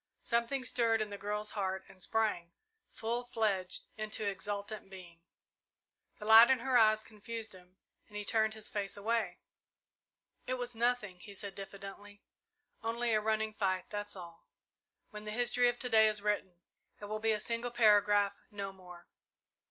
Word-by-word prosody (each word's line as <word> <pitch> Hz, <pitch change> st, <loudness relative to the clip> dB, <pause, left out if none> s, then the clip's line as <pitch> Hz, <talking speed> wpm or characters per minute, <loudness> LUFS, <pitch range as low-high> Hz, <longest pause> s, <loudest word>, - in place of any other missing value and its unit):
Something 235 Hz, +3 st, 0 dB
stirred 230 Hz, -2 st, +3 dB
in 215 Hz, -1 st, -2 dB
the 200 Hz, -, -5 dB
girl's 210 Hz, +1 st, -3 dB
heart 190 Hz, -2 st, -2 dB
and 185 Hz, -, -17 dB
sprang, 210 Hz, -7 st, 0 dB, 0.4 s
full 235 Hz, +2 st, -3 dB
fledged, 210 Hz, -6 st, -1 dB
into 215 Hz, 0 st, -2 dB
exultant 205 Hz, +1 st, -4 dB
being. 175 Hz, -3 st, -12 dB, 1.0 s
The 210 Hz, -, -8 dB
light 225 Hz, +2 st, +9 dB
in 265 Hz, -, +5 dB
her 260 Hz, 0 st, 0 dB
eyes 215 Hz, -2 st, +5 dB
confused 225 Hz, 0 st, -7 dB
him, 180 Hz, 0 st, -16 dB, 0.3 s
and 210 Hz, -, -9 dB
he 210 Hz, -, -4 dB
turned 220 Hz, 0 st, +2 dB
his 215 Hz, -1 st, -5 dB
face 200 Hz, -1 st, -2 dB
away. 215 Hz, -3 st, -1 dB, 1.1 s
"It 255 Hz, -, 0 dB
was 245 Hz, -1 st, -4 dB
nothing," 225 Hz, -5 st, 0 dB
he 200 Hz, +3 st, -11 dB
said 200 Hz, 0 st, -6 dB
diffidently, 200 Hz, +1 st, -9 dB, 0.6 s
"only 230 Hz, +1 st, 0 dB
a 215 Hz, -, +3 dB
running 220 Hz, 0 st, 0 dB
fight 185 Hz, -3 st, -1 dB
that's 205 Hz, -1 st, -4 dB
all. 170 Hz, -3 st, -11 dB, 0.6 s
When 210 Hz, -1 st, -8 dB
the -, -, -5 dB
history 245 Hz, +2 st, +2 dB
of 240 Hz, -, -3 dB
to 250 Hz, -, -2 dB
day 220 Hz, -1 st, +6 dB
is 210 Hz, -1 st, 0 dB
written, 190 Hz, -4 st, -1 dB, 0.4 s
it 205 Hz, -, -7 dB
will 215 Hz, +1 st, -3 dB
be 220 Hz, 0 st, +2 dB
a 210 Hz, -, -1 dB
single 230 Hz, +2 st, -2 dB
paragraph 205 Hz, -3 st, +4 dB, 0.2 s
no 200 Hz, -2 st, -5 dB
more. 180 Hz, -2 st, -13 dB
210 Hz, 165 wpm, -33 LUFS, 200-225 Hz, 1.1 s, light